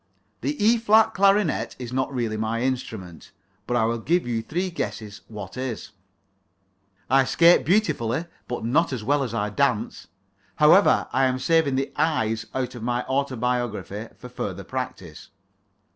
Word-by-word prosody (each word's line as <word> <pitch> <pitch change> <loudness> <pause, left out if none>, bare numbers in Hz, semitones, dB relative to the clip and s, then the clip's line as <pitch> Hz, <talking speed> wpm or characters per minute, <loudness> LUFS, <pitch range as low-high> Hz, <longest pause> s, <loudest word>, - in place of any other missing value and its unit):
The 140 +4 -1
E 225 +3 +3
flat 220 0 +4
clarionet 195 -3 +2
is 125 -1 -7
not 130 +1 -1
really 120 -5 -2
my 110 +2 -2
instrument, 110 - -4 0.4
but 120 - 0
I 110 - +2
will 115 +1 -1
give 170 +10 +1
you 115 -2 -1
three 180 +10 -3
guesses 105 -8 -5
what 105 -1 -9
is. 125 -4 -5 1.2
I 135 +1 +4
skate 170 +6 +5
beautifully, 165 - +1 0.2
but 120 -2 -4
not 155 +8 +2
so 120 -5 -5
well 145 +3 +2
as 120 -4 -3
I 105 -1 -1
dance. 125 -1 -1 0.5
However, - - +5
I 135 +1 +3
am 130 0 +1
saving 155 0 +2
the 135 +1 -1
I's 115 -8 0
out 130 -1 -2
of 120 - -9
my 120 +1 -1
autobiography 120 -6 -2
for 125 - -10
further 100 -6 -5
practice. 110 -9 -6
125 Hz, 155 wpm, -24 LUFS, 110-140 Hz, 1.2 s, skate